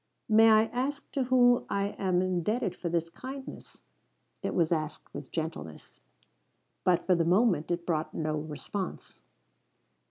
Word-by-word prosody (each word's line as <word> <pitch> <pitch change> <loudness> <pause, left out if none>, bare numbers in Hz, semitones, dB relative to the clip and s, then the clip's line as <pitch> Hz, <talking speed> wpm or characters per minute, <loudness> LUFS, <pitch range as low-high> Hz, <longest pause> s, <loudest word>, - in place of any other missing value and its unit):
"May 225 +1 +6
I 215 0 +6
ask 275 +3 -3
to 270 -2 0
whom 245 -1 +4
I 200 0 0
am 185 -3 0
indebted 185 +2 -1
for 175 - -4
this 165 0 0
kindness?" 265 +9 -9 0.6
It - - -3
was 170 -2 +2
asked 155 -2 -3
with 145 -1 -8
gentleness. 160 - -6 0.8
But 180 -1 +2
for 185 - +4
the 170 -1 +2
moment 180 -2 +2
it 170 0 -2
brought 160 -2 -1
no 155 -1 -1
response. 155 +5 -6
180 Hz, 140 wpm, -29 LUFS, 165-225 Hz, 0.8 s, May